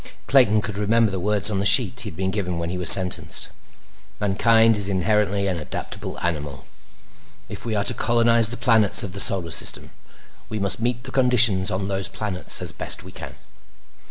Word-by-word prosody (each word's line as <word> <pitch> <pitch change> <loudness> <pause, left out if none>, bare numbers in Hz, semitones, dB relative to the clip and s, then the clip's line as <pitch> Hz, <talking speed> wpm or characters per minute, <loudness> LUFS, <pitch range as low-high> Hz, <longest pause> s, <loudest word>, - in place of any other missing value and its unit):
Clayton 115 -6 +2
could 105 -1 -5
remember 110 +1 0
the 95 - -5
words 105 +2 +2
on 100 - -3
the - - -3
sheet 120 +1 +3
he 110 - -7
had 80 - -15
been 95 0 -4
given 90 -4 -5
when 85 0 -6
he 90 - -6
was 90 - +4
sentenced. 95 -2 +4 0.7
"Mankind 110 +3 +1
is 100 -1 +1
inherently 100 +1 -2
an 90 -3 -4
adaptable 75 - -7
animal. 75 -5 -6 0.8
If - - -10
we 115 -2 -4
are 100 - -2
to - - +7
colonize 115 -1 +2
the 120 - -8
planets 110 -4 +2
of 95 - -8
the 100 - -7
Solar 90 -4 +2
System, - - +1 0.6
we 110 - -6
must 100 0 -4
meet 120 +1 -3
the - - -10
conditions 125 -7 +2
on 95 +1 -5
those 95 -2 -1
planets 100 -4 -3
as - - -3
best - - -3
we - - -14
can. - - -10
100 Hz, 190 wpm, -20 LUFS, 95-115 Hz, 0.8 s, to